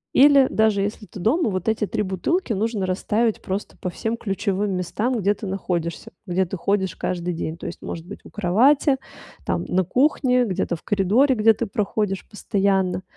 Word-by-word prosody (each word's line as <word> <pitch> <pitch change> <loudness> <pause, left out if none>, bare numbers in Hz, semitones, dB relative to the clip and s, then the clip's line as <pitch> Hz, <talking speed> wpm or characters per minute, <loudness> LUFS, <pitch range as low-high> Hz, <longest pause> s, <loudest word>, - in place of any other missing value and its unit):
Или 275 -1 +7
даже 220 -2 +2
если 210 +1 -4
ты 205 - -10
дома, 230 - +2
вот 185 -1 -3
эти 220 -1 +1
3 210 - -2
бутылки 215 - -1
нужно 210 -1 -1
расставить 210 +4 0
просто 195 +2 -4
по 180 - -4
всем 225 +6 -3
ключевым 200 -2 -1
местам, 225 +7 -1
где 200 0 +2
ты 210 - -8
находишься, 175 -3 -3
где 185 0 +1
ты 180 - -5
ходишь 190 +1 0
каждый 180 -1 -2
день. 160 -1 -4
То - - -10
есть, 175 - -8
может 165 -1 -6
быть, 205 - -9
у - - -13
кровати, 250 +9 +3 0.5
там, - - -1
на 185 +1 +2
кухне, 250 - +2
где-то 180 -4 -2
в - - -23
коридоре, 215 +7 +3
где 225 0 +5
ты 235 - -3
проходишь 200 -1 -2
постоянно. 195 -3 0
205 Hz, 180 wpm, -23 LUFS, 185-225 Hz, 0.5 s, Или